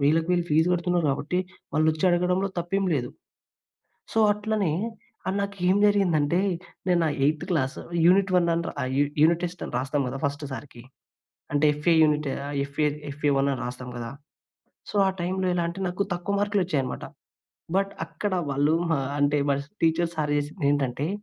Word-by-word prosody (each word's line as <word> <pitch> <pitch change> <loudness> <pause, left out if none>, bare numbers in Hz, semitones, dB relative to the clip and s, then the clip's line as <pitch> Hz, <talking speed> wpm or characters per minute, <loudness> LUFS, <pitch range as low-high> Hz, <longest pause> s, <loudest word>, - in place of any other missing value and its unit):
వేలకు 160 +4 +3
వేలు 175 -1 +2
ఫీజు 160 +3 +4
కడుతున్నారు 175 -1 +1
కాబట్టి, 150 +6 -1 0.3
వాళ్ళు 155 +2 +2
వచ్చి 155 +2 -3
అడగడంలో 180 +2 +1
తప్పేం 195 +3 -1
లేదు. 125 -4 -2 1.0
సో, - - 0
అట్లనే, 210 -3 -1 0.6
ఆహ్, 190 - 0
నాకు 200 0 -3
ఏం 185 - +4
జరిగిందంటే, 175 -5 +2 0.5
నేను 180 -2 +3
నా - - +2 0.2
ఎయిత్ 150 +1 0
క్లాస్ 140 -6 0 0.3
యూనిట్ 190 +1 +4
1 175 -1 +3
అని 170 0 -1
ర - - -5
ఆహ్, 130 - -2
యు 145 - +5 0.2
యూనిట్ 170 +2 +4
టెస్ట్ 175 -1 -5
అని - - -8
రాస్తాం 135 +2 -1
కదా! 135 - -5
ఫస్ట్ 145 +1 -2
సారికీ, 130 -3 -8 0.7
అంటే 145 +1 +4
ఎఫ్ఏ 150 +3 +2
యూనిట్ 150 -1 +2 0.2
ఆహ్, 145 0 -4
ఎఫ్ఏ 140 +2 -1 0.3
ఎఫ్ఏ 145 +1 0
1 135 +1 +2
అని 130 - -6
రాస్తాం 125 0 -6
కదా! 115 -1 -5 0.8
సో, - - -9
ఆ - - +3
టైమ్‌లో 185 +2 -1
ఎలాంటే 170 +2 -2
నాకు, 180 +3 -1
తక్కువ 180 +3 -2
మార్కులోచ్చాయన్నమాట. 185 -10 -1 0.7
బట్, 195 0 -1
అక్కడ 205 -2 -4 0.2
వాళ్ళు, 145 +3 +2 0.2
ఆ! - - -1 0.2
అంటే 145 +1 +3
మా 140 - +3 0.3
టీచర్స్, 165 +1 +2
సార్ 150 -1 0
చేసిందెంటంటే, 145 -2 -1
160 Hz, 165 wpm, -26 LUFS, 145-180 Hz, 1.0 s, యు